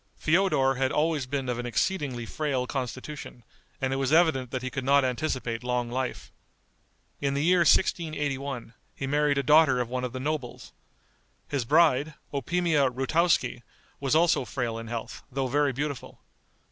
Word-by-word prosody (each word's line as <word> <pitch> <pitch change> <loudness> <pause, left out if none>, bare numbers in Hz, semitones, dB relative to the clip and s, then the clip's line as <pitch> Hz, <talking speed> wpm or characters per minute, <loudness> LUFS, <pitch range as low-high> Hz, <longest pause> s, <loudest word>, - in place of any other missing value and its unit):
Feodor 155 -6 +2
had 130 -1 +1
always 150 -4 0
been 135 -1 -3
of 120 -1 -2
an 120 - -3
exceedingly 125 - -1
frail 135 -2 -2
constitution, 130 0 -6 0.4
and 135 -2 -1
it - - -1
was 135 0 0
evident 155 -6 +3
that 130 +1 -4
he 130 - -3
could 130 +1 -3
not 140 +1 +4
anticipate 125 -3 -2
long 125 -1 -1
life. 130 +1 -4 0.9
In 140 -1 -1
the 140 - 0
year 180 +2 +4
1681 145 -8 +1 0.2
he 135 - -4
married 145 +1 +1
a 140 - +1
daughter 150 -1 +5
of 120 -1 -2
one 125 0 -3
of 125 - -3
the 130 - -5
nobles. 145 -3 -4 0.8
His 140 -5 -1
bride, 150 0 +3 0.2
Opimia 150 0 +1
Routoski, 135 0 +1 0.4
was 140 +1 0
also 165 -3 +3
frail 120 -3 -3
in 115 - -8
health, 115 -1 -6
though 135 +1 -1
very 145 +2 +1
beautiful. 140 0 -5
135 Hz, 160 wpm, -27 LUFS, 125-150 Hz, 0.9 s, daughter